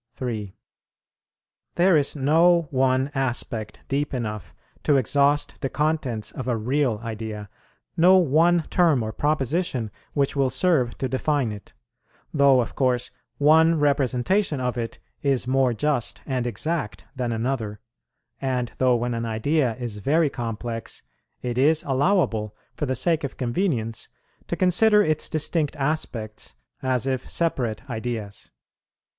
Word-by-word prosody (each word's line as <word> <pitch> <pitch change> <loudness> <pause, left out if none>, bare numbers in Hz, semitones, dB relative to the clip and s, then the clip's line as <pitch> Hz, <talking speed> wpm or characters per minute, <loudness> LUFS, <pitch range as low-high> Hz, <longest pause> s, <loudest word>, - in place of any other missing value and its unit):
3. 110 -6 -5 1.2
There 180 +1 +4
is 145 -1 +2
no 165 +4 +4
one 130 +1 +1
aspect 120 -5 -3
deep 140 +1 -1
enough 105 -8 -5 0.3
to 145 -2 +3
exhaust 140 +3 +1
the 135 - -1
contents 150 -8 -1
of 130 - -6
a 120 -2 +1
real 125 0 0
idea, 110 -2 -6 0.5
no 185 +3 +6
one 170 +1 +3
term 160 -9 +3
or 110 - -3
proposition 145 - -1 0.2
which 140 -1 0
will 135 -2 +2
serve 140 -8 +1
to 130 - -1
define 130 -1 0
it; 105 -1 -10 0.6
though 140 -3 +5
of 115 - -5
course 125 -2 0 0.3
one 160 +2 +5
representation 145 - +1
of 125 -2 -1
it 115 -2 -4 0.2
is 135 -3 +1
more 130 0 +2
just 140 +1 -1
and 130 -3 -1
exact 135 +2 -3
than 125 -2 -2
another, 115 -3 -2 0.6
and 125 -3 -1
though 130 -1 +4
when 120 +1 -1
an 115 0 -2
idea 120 +3 0
is 120 -4 -5
very 150 +6 +2
complex, 115 -2 -5 0.4
it 125 0 -2
is 155 +4 +3
allowable, 135 - +1 0.2
for 150 - -3
the 130 - 0
sake 165 +4 +1
of 140 - -5
convenience, 120 - -2 0.4
to - - -2
consider 210 +4 +4
its 155 -3 0
distinct 155 -1 -1
aspects 130 - -3 0.3
as 130 -1 0
if 130 -2 -2
separate 125 -8 -1
ideas. 110 -4 -5
130 Hz, 135 wpm, -24 LUFS, 115-150 Hz, 1.2 s, no